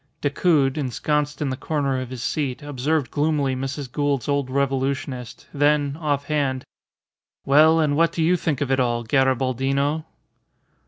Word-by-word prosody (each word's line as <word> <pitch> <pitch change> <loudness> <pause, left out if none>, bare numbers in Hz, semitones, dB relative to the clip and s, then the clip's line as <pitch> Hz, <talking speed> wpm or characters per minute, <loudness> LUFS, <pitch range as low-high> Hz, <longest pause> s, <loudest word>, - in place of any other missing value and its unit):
Decoud, 145 -1 +2
ensconced 150 +3 -1
in 135 - -1
the - - -2
corner 140 -2 -1
of 130 - -6
his 125 -2 -6
seat, 140 -2 -2
observed 145 -1 -1
gloomily 145 -3 0
Mrs. 135 0 -5
Gould's 145 -4 -1
old 140 -2 0
revolutionist, 135 -2 -2
then, 145 0 +2
offhand 145 -3 -1 0.8
"Well, 155 +4 +5
and 150 -2 +2
what 165 +2 +3
do 165 - -1
you 175 +3 +4
think 155 -5 -2
of 135 -2 -1
it 135 - +2
all, 120 -2 0
Garibaldino?" 135 +4 +1
140 Hz, 145 wpm, -23 LUFS, 130-150 Hz, 0.8 s, Well